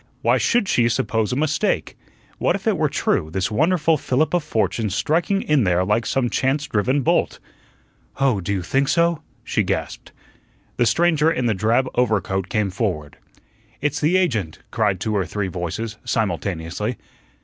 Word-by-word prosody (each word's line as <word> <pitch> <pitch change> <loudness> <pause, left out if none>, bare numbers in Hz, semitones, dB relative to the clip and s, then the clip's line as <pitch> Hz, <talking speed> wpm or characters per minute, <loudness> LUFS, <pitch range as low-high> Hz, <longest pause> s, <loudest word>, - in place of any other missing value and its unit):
Why - - +3
should 240 -5 +2
she 120 -7 +3
suppose 115 -3 0
a - - 0
mistake? 155 +2 0 0.4
What - - +2
if - - -7
it - - +2
were - - +1
true, 80 - 0
this 95 +6 -2
wonderful 160 +5 +2
fillip 140 +4 0
of 175 -3 +2
fortune 110 -5 -1
striking 170 - 0
in 150 -5 +2
there 90 -1 +2
like 105 +4 +1
some 130 -2 +1
chance 135 +5 0
driven 130 +6 0
bolt? - - +1 0.8
"Oh, 130 -8 +2
do 90 - -3
you 95 -3 -1
think 135 +9 +1
so?" 170 0 +2 0.2
she - - 0
gasped. - - -3 0.7
The 120 - +3
stranger 160 +4 +3
in 130 -6 -1
the 115 - +2
drab 115 +6 +1
overcoat 95 -6 0
came 105 -3 0
forward. 90 - -3 0.6
"It's 150 +1 -1
the 160 +5 +3
agent," 115 - 0
cried 105 -5 +1
two 110 +3 -2
or 100 - +1
three 100 +3 -3
voices, 95 +5 -4
simultaneously. 100 +1 -2
115 Hz, 165 wpm, -21 LUFS, 100-150 Hz, 0.8 s, Why